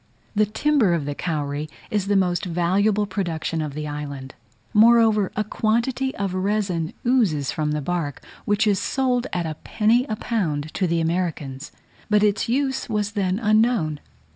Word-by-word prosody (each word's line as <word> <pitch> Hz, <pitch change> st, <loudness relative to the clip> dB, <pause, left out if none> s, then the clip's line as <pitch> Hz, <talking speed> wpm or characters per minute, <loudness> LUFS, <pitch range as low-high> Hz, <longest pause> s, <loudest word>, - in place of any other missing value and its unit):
The 210 Hz, 0 st, +2 dB
timber 225 Hz, -4 st, +2 dB
of 155 Hz, -4 st, -2 dB
the 145 Hz, -, -2 dB
kauri 150 Hz, -2 st, -3 dB, 0.2 s
is 205 Hz, -2 st, 0 dB
the 205 Hz, -, +2 dB
most 180 Hz, -2 st, +1 dB
valuable 190 Hz, +5 st, +1 dB
production 170 Hz, -4 st, -2 dB
of 150 Hz, -2 st, -4 dB
the 150 Hz, 0 st, -4 dB
island; 140 Hz, -2 st, -6 dB, 0.4 s
moreover, 220 Hz, -2 st, +5 dB
a 215 Hz, -, +1 dB
quantity 235 Hz, +5 st, 0 dB
of 195 Hz, -2 st, -2 dB
resin 185 Hz, -4 st, -1 dB
oozes 200 Hz, -, +2 dB
from 155 Hz, -1 st, -1 dB
the 150 Hz, -, -1 dB
bark, 165 Hz, -4 st, -2 dB, 0.3 s
which 205 Hz, +1 st, +2 dB
is 205 Hz, -3 st, +2 dB
sold 255 Hz, +1 st, 0 dB
at 175 Hz, -1 st, -1 dB
a 155 Hz, -1 st, -4 dB
penny 230 Hz, +4 st, +2 dB
a 215 Hz, -, -1 dB
pound 155 Hz, -10 st, -2 dB
to 185 Hz, -, 0 dB
the 170 Hz, 0 st, +1 dB
Americans, 160 Hz, -5 st, -2 dB, 0.4 s
but 210 Hz, 0 st, +4 dB
its 210 Hz, +1 st, +1 dB
use 265 Hz, +1 st, 0 dB
was 210 Hz, -1 st, -1 dB
then 195 Hz, -3 st, 0 dB
unknown. 215 Hz, -8 st, +2 dB
195 Hz, 165 wpm, -23 LUFS, 160-215 Hz, 0.4 s, moreover